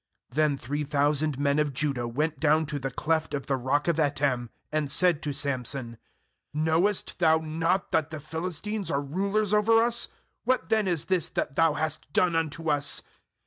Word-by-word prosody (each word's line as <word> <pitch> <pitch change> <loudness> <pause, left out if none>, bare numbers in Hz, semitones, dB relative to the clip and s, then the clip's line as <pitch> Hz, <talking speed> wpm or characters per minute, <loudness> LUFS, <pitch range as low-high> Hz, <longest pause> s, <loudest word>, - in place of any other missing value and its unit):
uThen 150 -1 +2
three 145 +5 -3
thousand 145 0 +1
men 140 +1 +1
of 145 -3 0
Judah 135 -4 -1
went 150 +5 -2
down 155 +2 +3
to 145 -1 -4
the 135 0 -3
cleft 160 +4 -1
of 140 - -4
the 135 - 0
rock 135 +4 0
of 170 -2 +2
Etam, 140 -5 +1 0.2
and 155 -2 -1
said 170 +1 +3
to 150 - -2
Samson: 130 -4 -3 0.6
'Knowest 160 +8 +1
thou 160 -2 +5
not 165 +4 -1
that 160 -1 +1
the 155 - -6
Philistines 180 +7 -3
are 140 - +1
rulers 195 +8 -1
over 220 +2 +5
us? 235 +1 +2 0.4
what 255 -10 0
then 215 -3 +2
is 170 -5 -1
this 185 -4 +1
that 135 - -3
thou 165 -2 +4
hast 155 -2 -3
done 175 -2 +3
unto 165 0 -2
us?' 145 -1 +1
155 Hz, 180 wpm, -27 LUFS, 140-165 Hz, 0.6 s, thou